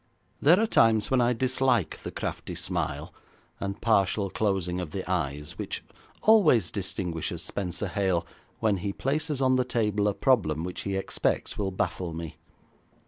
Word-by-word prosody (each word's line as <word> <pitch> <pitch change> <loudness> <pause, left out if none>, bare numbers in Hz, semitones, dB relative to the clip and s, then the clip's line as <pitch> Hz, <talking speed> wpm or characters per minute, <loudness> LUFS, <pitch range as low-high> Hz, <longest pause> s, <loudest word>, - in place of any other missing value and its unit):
There 170 +7 +6
are 225 - +3
times 115 - +3
when 130 -2 +4
I 120 0 +3
dislike 130 -4 +1
the - - -6
crafty - - -5
smile - - -3 0.5
and 100 0 -4
partial 100 -3 +2
closing 95 -4 0
of 80 -4 -6
the 95 - -4
eyes 75 -5 -2
which - - -4 0.4
always 200 - +5
distinguishes 90 -4 -3
Spenser 95 +1 -3
Hale 95 -1 0 0.3
when 105 -3 +2
he 100 +2 -3
places 145 +2 -1
on 130 0 +4
the 130 - +3
table 105 -4 0
a 100 - 0
problem 80 - +2
which 90 0 -4
he 100 -1 -2
expects 95 - -1
will 100 -2 -1
baffle 90 -2 -2
me. 85 -2 -6
100 Hz, 155 wpm, -27 LUFS, 90-125 Hz, 0.5 s, There